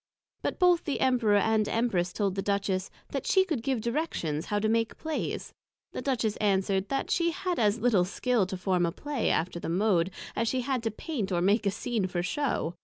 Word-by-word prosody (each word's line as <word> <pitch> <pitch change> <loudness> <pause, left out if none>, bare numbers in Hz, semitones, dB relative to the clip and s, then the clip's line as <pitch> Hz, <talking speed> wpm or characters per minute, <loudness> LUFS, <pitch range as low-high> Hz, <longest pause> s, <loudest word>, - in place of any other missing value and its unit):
But - - -2
both 355 -2 +4
the 290 - -1
Emperor 245 -5 +3
and 215 0 +2
the - - -3
Empress 195 -7 +1
told 200 0 0
the 195 - -2
Duchess, 200 -2 -1 0.2
That - - -4
she 380 -2 +4
could 315 -10 -2
give 260 -2 -1
directions 225 - -2
how 205 - 0
to 210 +1 +1
make 225 0 0
Plays. 315 -1 -3 0.4
The - - -5
Duchess 230 -6 0
answered, 195 -1 +1
That 275 0 -1
she 340 -1 +2
had 355 +1 -2
as 210 -1 +3
little 220 -7 +3
skill 225 +1 0
to 190 0 -4
form 180 -1 +1
a - - -1
Play 285 - -2
after 170 +1 0
the - - -4
Mode, 180 -1 +2 0.3
as 230 - 0
she 255 +2 0
had 255 -1 -1
to 225 - -1
paint 220 - -4
or 175 - +1
make 200 +4 +2
a - - +5
Scene 220 0 -1
for 175 -1 -2
shew. 270 - -1
215 Hz, 215 wpm, -28 LUFS, 190-255 Hz, 0.4 s, a